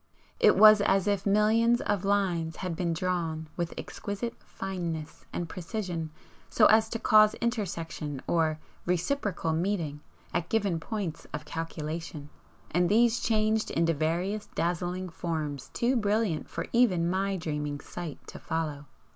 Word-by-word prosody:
It - - +6
was 215 -1 +9
as 195 -1 +2
if 200 -1 0
millions 220 +4 +4
of 205 -8 -1
lines 180 -5 +1
had 180 -3 -4
been 170 0 -1
drawn 165 -2 -2
with 170 -1 -3
exquisite 210 +3 -4
fineness 170 -5 -5
and 175 - -3
precision 175 -2 -4 0.4
so 215 - +4
as 220 +1 +5
to 230 - -2
cause 215 -1 +5
intersection 165 - -3
or 160 -2 +1 0.3
'reciprocal 180 - 0
meeting' 165 -4 -1 0.3
at 170 - -1
given 200 -7 +1
points 180 -3 -4
of 150 - -6
calculation, 160 -2 -5 0.4
and 175 +1 +2
these 230 +2 +4
changed 220 -1 +1
into 165 0 +2
various 175 +7 -1
dazzling 175 +2 -1
forms 155 -5 -4
too 245 +2 +1
brilliant 210 -6 0
for 165 - -4
even 195 -9 +4
my 195 +2 0
dreaming 150 -3 -3
sight 170 -2 -7
to - - -9
follow. 155 -3 -3
180 Hz, 140 wpm, -29 LUFS, 160-210 Hz, 0.4 s, was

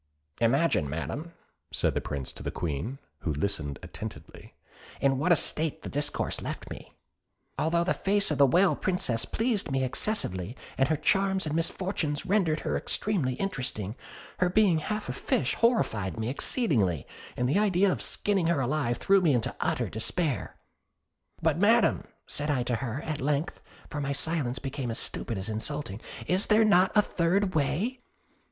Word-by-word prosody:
"Imagine, 120 - +2
Madam," 140 - -4 0.4
said - - +1
the - - -1
Prince 70 -3 -4
to - - -11
the - - -3
Queen, 85 - -3 0.2
who 80 - -2
listened 75 -2 -2
attentively, - - -7 0.4
"in 135 -1 +2
what 170 +5 +2
a - - +8
state 155 +1 -1
this - - -6
discourse 145 +1 -1
left - - -6
me." - - -9 0.6
Although 170 +2 +2
the 180 - +1
face 200 -2 +1
of 150 - -1
the 140 - +7
Whale 180 +8 +4
Princess 130 -11 -1
pleased 225 -6 -1
me 135 -1 +1
excessively, 125 - -1 0.2
and 135 +1 +2
her 160 - +3
charms 195 +4 +2
and 155 - -2
misfortunes 165 -2 -1
rendered 185 -5 +2
her - - -1
extremely 175 -12 0
interesting, 125 - -3 0.5
her 180 - +3
being 185 -4 +4
half 210 +7 -3
a 125 - -2
fish 125 0 0
horrified 115 - +1
me 110 +1 -1
exceedingly; 120 - 0 0.3
and 125 - +1
the 150 +10 +3
idea 200 -2 +3
of - - -2
skinning 195 -5 0
her 170 -3 +2
alive 130 -2 0
threw 195 0 +4
me 155 -7 +4
into 115 - -1
utter - - 0
despair. 130 - -2 0.9
'But, 160 0 +2
Madam,' 225 +4 +4 0.2
said 145 +1 -2
I 130 -4 +2
to 120 -1 0
her, 130 +2 -4
at 155 -2 -3
length 145 +5 -1 0.3
(for 150 - -4
my 140 0 -1
silence 140 -4 -1
became 135 -1 -4
as 115 - -3
stupid 115 - -2
as 95 +1 -4
insulting), 110 -1 -4 0.2
'is 185 +3 +3
there 220 +1 +5
not 190 -3 +5
a 210 - +6
third 185 +3 +1
way?' 160 - 0
150 Hz, 170 wpm, -28 LUFS, 125-185 Hz, 0.9 s, a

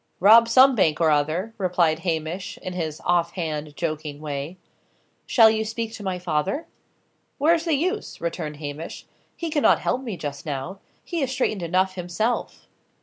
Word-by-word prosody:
"Rob 225 +5 +7
some 260 +3 +7
bank 160 -9 +2
or 160 -2 +4
other," 155 +9 0
replied 175 -4 +2
Hamish, 175 +4 -3
in 185 - -4
his 160 -4 -4
off 170 -1 +2
hand, 155 -4 -4
joking 155 -3 -3
way. 150 +3 -5 0.7
"Shall 225 -3 +6
you 220 0 0
speak 225 +1 -4
to 220 - -8
my 190 -2 -2
father?" 180 - -1 0.7
"Where's 330 +3 +3
the 325 -3 +2
use?" 370 +9 -2
returned 165 -3 -4
Hamish. 150 +2 -7 0.3
"He 335 -2 -4
cannot 295 -2 +4
help 255 - -1
me 225 -8 -5
just 145 -3 -6
now; 155 +6 -5 0.2
he 340 -3 -3
is 270 - 0
straitened 255 -7 -1
enough 185 +3 +1
himself." 185 +6 -2
180 Hz, 160 wpm, -24 LUFS, 155-225 Hz, 0.7 s, Rob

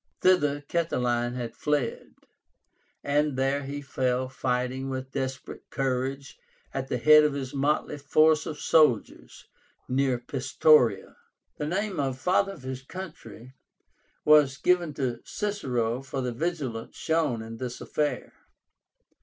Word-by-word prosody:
Thither 150 -6 +3
Catiline 125 -7 -1
had 120 -2 -5
fled, 145 -5 -2 0.9
and 145 -1 +1
there 135 +2 +1
he 145 +1 -5
fell 130 -2 -1
fighting 130 0 -2
with 130 0 -5
desperate 135 -1 -5
courage 135 +1 -2 0.3
at 135 -1 -3
the 125 - -1
head 150 +5 +7
of 150 -1 +2
his 135 -1 -5
motley 145 +1 0
force 155 +2 +3
of 155 - -5
soldiers 150 -10 +1 0.4
near 130 -1 +1
Pistoria. 130 -4 +2 0.4
The 150 - -3
name 190 +1 -2
of 135 -2 -1
"Father 190 +6 +1
of 150 - -14
his 130 0 -5
Country" 135 -6 -10 0.7
was 150 -3 +5
given 175 -5 +1
to 125 -4 -2
Cicero 125 - -2
for 135 0 -4
the 125 -1 -2
vigilance 135 -5 -3
shown 155 -8 0
in 115 0 -8
this 125 0 -5
affair. 150 -1 -2
135 Hz, 130 wpm, -27 LUFS, 125-150 Hz, 0.9 s, head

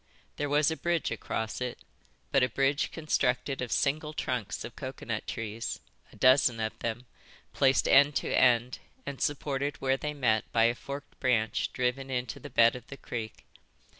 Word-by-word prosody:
There 145 0 -2
was 150 +2 +3
a - - -1
bridge 170 -3 0
across 110 +2 -3
it, 125 -1 -3 0.5
but 135 - +4
a 125 - +3
bridge 135 +4 +1
constructed 135 -4 0
of 125 - -4
single 150 +2 0
trunks 120 -7 -3
of 120 - -9
coconut 125 -4 -5
trees, 115 0 -4 0.3
a - - -16
dozen 130 -3 +4
of 110 0 -3
them, 115 +2 -3 0.5
placed 135 -1 +3
end 140 +1 +6
to - - -1
end 125 0 +3 0.3
and 140 -2 -6
supported 145 0 -1
where 135 0 +1
they 150 +1 -4
met 110 -6 +1
by 115 - +3
a 115 +1 +4
forked 140 +3 -8
branch 115 -4 +1
driven 125 +2 -1
into 125 -3 -3
the - - -9
bed 115 +1 +5
of 125 - -9
the 140 - -9
creek. 110 -4 -6
130 Hz, 170 wpm, -29 LUFS, 115-140 Hz, 0.5 s, end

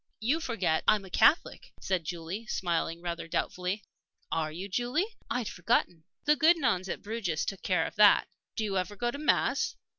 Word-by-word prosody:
"You 255 +9 +1
forget 210 - 0
I'm 210 -2 +4
a 190 - -13
Catholic," 325 - +2
said 185 -4 -1
Julie, 175 +7 -5
smiling 170 -2 -1
rather 170 -1 -4
doubtfully. 180 +4 -2 0.5
"Are 155 -1 -1
you, 180 +5 -6
Julie? 245 - 0 0.2
I'd 245 -3 -1
forgotten." 175 -2 0 0.2
"The 300 +1 +5
good 330 +3 +5
nuns 205 - 0
at - - -4
Bruges 205 -8 -2
took 195 - -4
care 180 -4 +1
of - - -7
that." 210 -1 +6 0.3
"Do 220 - -1
you 195 -3 0
ever 195 +3 -4
go 240 +3 -1
to 280 - -7
mass?" 460 +9 +1
195 Hz, 180 wpm, -29 LUFS, 175-240 Hz, 0.5 s, that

